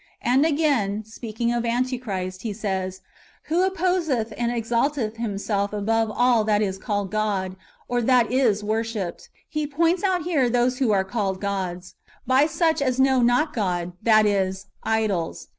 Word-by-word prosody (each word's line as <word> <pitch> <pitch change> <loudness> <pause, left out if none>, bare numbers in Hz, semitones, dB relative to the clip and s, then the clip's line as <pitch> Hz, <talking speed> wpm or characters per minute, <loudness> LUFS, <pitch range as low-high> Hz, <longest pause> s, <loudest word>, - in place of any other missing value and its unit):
And 265 +6 +3
again, 260 -10 +1
speaking 225 +1 -3
of 240 -1 -1
Antichrist, 230 -7 -2
he 220 -1 -3
says, 190 -3 -3 0.2
" - - -30
who 335 +3 +2
opposeth 340 - 0
and 235 0 -1
exalteth 235 0 -1
himself 205 -2 -2
above 225 +2 +1
all 240 0 +3
that 210 -1 +2
is 190 -1 -3
called 205 -3 -2
God, 200 -3 -1 0.3
or 245 0 0
that 245 0 +3
is 235 -6 +2
w^orshipped."^ 215 -4 -3 0.2
He 305 -1 -2
points 335 +5 +1
out 370 -4 +1
here 295 -8 +1
those 245 +2 +1
who 260 -4 +2
are 195 -2 +3
called 195 -2 -2
gods, 185 -2 -4 0.3
by 260 +4 +4
such 320 -1 +1
as 255 -2 0
know 265 -1 +4
not 245 +6 +2
God, 180 -5 -1
that 215 -1 +5
is, 190 -1 0 0.2
idols. 215 -7 -1
225 Hz, 160 wpm, -24 LUFS, 200-260 Hz, 0.3 s, that